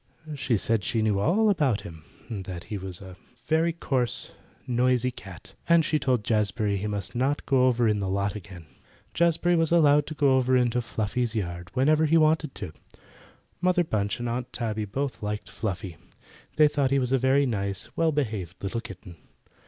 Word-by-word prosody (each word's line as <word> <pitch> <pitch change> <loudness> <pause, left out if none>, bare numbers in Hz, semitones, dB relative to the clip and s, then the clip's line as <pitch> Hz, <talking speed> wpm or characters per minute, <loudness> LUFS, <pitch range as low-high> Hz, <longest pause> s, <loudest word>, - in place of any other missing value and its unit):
She 130 -5 0
said 110 0 0
she 110 +3 0
knew 105 -2 +1
all 195 - +3
about 145 - +2
him; 80 -2 -11 0.2
that 95 -6 -6
he 105 - -5
was 95 -1 -7
a 95 -2 -11 0.3
very 160 +3 +2
coarse, 130 -7 -1 0.3
noisy 125 0 +1
cat, 95 -8 -11 0.2
and 170 -2 +5
she 155 - +1
told 125 -6 +1
Jazbury 105 -1 0
he 100 +2 -3
must 100 -2 -3
not 135 +4 0
go 130 -2 +3
over 120 -2 +2
in 105 -1 +1
the 95 -1 -2
lot 100 +1 0
again. 90 -4 -10 0.5
Jazbury 170 +1 +2
was 165 -1 +1
allowed 150 -3 +4
to 155 - -6
go 140 -3 +3
over 130 0 +3
into 125 -1 +1
Fluffy's 115 +1 -2
yard 85 -4 -4
whenever 155 +4 +3
he 165 +2 +4
wanted 155 -2 +2
to. 80 - -6 0.9
Mother 180 0 +3
Bunch 105 -9 -1
and 120 - -3
Aunt 120 +1 -3
Tabby 110 -3 -3
both 130 +5 -4
liked 105 0 -4
Fluffy. 95 -5 -4 0.6
They 155 -1 +6
thought 145 -2 0
he 140 - +2
was 125 -2 0
a 135 - +3
very 135 +2 +3
nice, 100 -5 -3
well 165 -1 +2
behaved 105 - -3
little 115 +4 -2
kitten. 90 -5 -11
120 Hz, 185 wpm, -26 LUFS, 100-145 Hz, 0.9 s, They